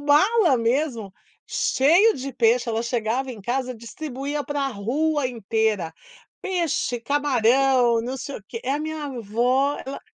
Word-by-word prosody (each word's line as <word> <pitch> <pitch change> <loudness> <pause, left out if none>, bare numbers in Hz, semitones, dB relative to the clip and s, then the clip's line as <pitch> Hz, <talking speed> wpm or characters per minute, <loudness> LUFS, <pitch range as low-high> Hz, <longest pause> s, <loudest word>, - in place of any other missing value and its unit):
mala 325 - +4
mesmo, 230 -4 -1 0.3
cheia 345 +12 +3
de 270 0 -6
peixe. 235 +1 +2
Ela 225 0 -1
chegava 240 +2 -1
em 230 -4 -9
casa 255 +4 -2
e - - -12
distribuía 280 +4 -5
pra 285 -1 -1
rua 270 +7 0
inteira: 220 -6 -1 0.5
peixe, 335 -9 -1
camarão, 255 -2 +3
não 255 +3 -4
sei 280 +1 -6
o - - -11
quê. 230 - -7
É, 260 - 0
a 290 - -1
minha 300 -5 -5
vó, 250 +6 +1
ela 270 - -6
260 Hz, 150 wpm, -23 LUFS, 230-290 Hz, 0.5 s, mala